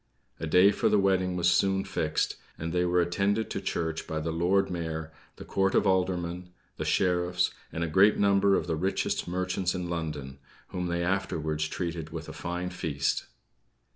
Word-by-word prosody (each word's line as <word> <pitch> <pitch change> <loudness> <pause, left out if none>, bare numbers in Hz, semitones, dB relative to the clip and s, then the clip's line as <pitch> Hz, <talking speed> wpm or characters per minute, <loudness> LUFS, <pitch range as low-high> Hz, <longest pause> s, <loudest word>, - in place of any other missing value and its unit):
A 80 - -3
day 90 +5 +6
for - - +1
the - - +4
wedding 95 -2 +2
was 90 -1 +1
soon 95 +2 +2
fixed; - - -1 0.2
and 80 +1 -4
they 90 0 +2
were 90 0 +3
attended 100 +5 0
to - - -3
church 80 -1 -2
by 80 - -2
the 80 +1 -2
Lord 90 +4 +2
Mayor, 80 -2 -4 0.2
the - - -10
Court 95 0 +1
of - - +4
Aldermen, 90 -2 0 0.3
the - - -3
Sheriffs, 90 -1 +1 0.2
and 85 - -2
a - - 0
great 95 +6 +5
number 100 -1 +4
of - - 0
the 85 -2 -1
richest 95 +5 -1
merchants 90 +1 -1
in 90 -1 -3
London, 75 -5 -4 0.3
whom 90 -1 -3
they 85 0 -1
afterwards 80 -5 -1
treated 85 -1 -4
with 80 0 -7
a - - -7
fine 90 +1 -4
feast. 75 -6 -1
90 Hz, 180 wpm, -28 LUFS, 80-95 Hz, 0.3 s, day